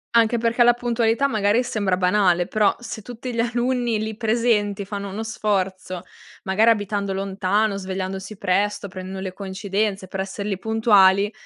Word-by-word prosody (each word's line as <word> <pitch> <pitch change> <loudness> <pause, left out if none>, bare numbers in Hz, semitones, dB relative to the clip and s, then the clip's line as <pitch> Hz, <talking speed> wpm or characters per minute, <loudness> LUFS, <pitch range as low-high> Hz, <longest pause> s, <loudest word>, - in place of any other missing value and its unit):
Anche 230 0 +4
perché 235 +1 +3
la 240 0 +6
puntualità 240 +1 +1
magari 215 -1 +2
sembra 200 -6 0
banale, 180 -1 +2
però 210 -2 +2
se 225 -2 -7
tutti 245 +2 -7
gli 230 - -3
alunni 240 -1 0
lì 220 0 -4
presenti 220 -3 +1
fanno 200 0 -5
uno 205 +3 -5
sforzo, 190 -4 -2 0.4
magari 215 +5 +4
abitando 205 -2 -1
lontano 195 +2 0
svegliandosi 190 +1 -5
presto, 200 +2 0
prendendo 185 0 -7
le 190 -1 -5
coincidenze 195 0 -3
per 190 +1 -4
esser 195 +1 -5
lì 195 - -1
puntuali, 205 -2 +4
205 Hz, 150 wpm, -22 LUFS, 190-225 Hz, 0.4 s, la